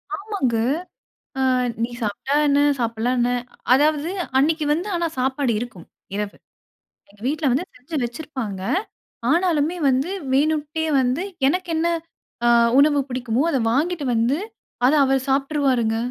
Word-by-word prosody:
ஆமாங்க. 400 - -2 0.8
அ - - +1 0.4
நீ 235 - -1
சாப்பட்டா 225 +6 -1
என்ன? 285 0 +3 0.2
சாப்பிடலன்னா 230 +1 0
என்ன? 245 +1 +2 0.4
அதாவது, 300 +3 +2 0.3
அன்னைக்கு 310 +3 +2
வந்து 350 +6 -2
ஆனா, 340 0 0
சாப்பாடு 265 0 0
இருக்கும். 225 -8 -8 0.3
இரவு 210 0 -4 0.7
எங்க 205 0 -22
வீட்ல 300 +1 0
வந்து 285 +8 0
செஞ்சு 270 +6 -7
வச்சிருப்பாங்க. 240 -6 -5 0.7
ஆனாலுமே 335 -1 +2
வந்து 265 +7 +1 0.2
வேணும்ட்டே 305 +2 +1
வந்து, 255 +6 0 0.3
எனக்கு 365 +3 -1
என்ன 325 - +1 0.6
அ - - +5 0.3
உணவு 290 0 +5
புடிக்குமோ 250 0 -1
அத 275 - +1
வாங்கிட்டு 315 +4 0
வந்து 235 +5 +2 0.5
அத 270 - +4
அவர் 270 0 +1
சாப்ட்டுருவாருங்க! 270 -5 +1
275 Hz, 125 wpm, -22 LUFS, 245-310 Hz, 0.8 s, அ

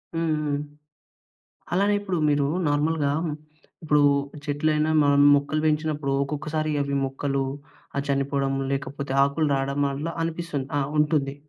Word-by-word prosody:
హుహు. 155 -3 0 1.2
అలానే 200 +3 +3
ఇప్పుడు 190 -4 -2
మీరు 145 -1 +2 0.2
నార్మల్‍గా, 145 0 +1 0.7
ఇప్పుడు 150 -2 +3 0.4
చెట్లైనా 150 +1 +1
మనం 140 0 +4
మొక్కలు 145 +2 0
పెంచినప్పుడు 150 -2 0
ఒక్కొక్కసారి 150 +2 -2
అవి 140 0 -2
మొక్కలు 135 +1 -1 0.5
ఆ - - +1
చనిపోవడం, 140 0 0 0.2
లేకపోతే 140 0 -3
ఆకులు 140 +3 +1
రాడం, 135 +1 -1
అలా 150 +5 -4
అనిపిస్తుంది. 165 -4 -3
ఆ! - - +2 0.2
ఉంటుంది. 150 -2 +1
145 Hz, 115 wpm, -25 LUFS, 140-155 Hz, 1.2 s, మనం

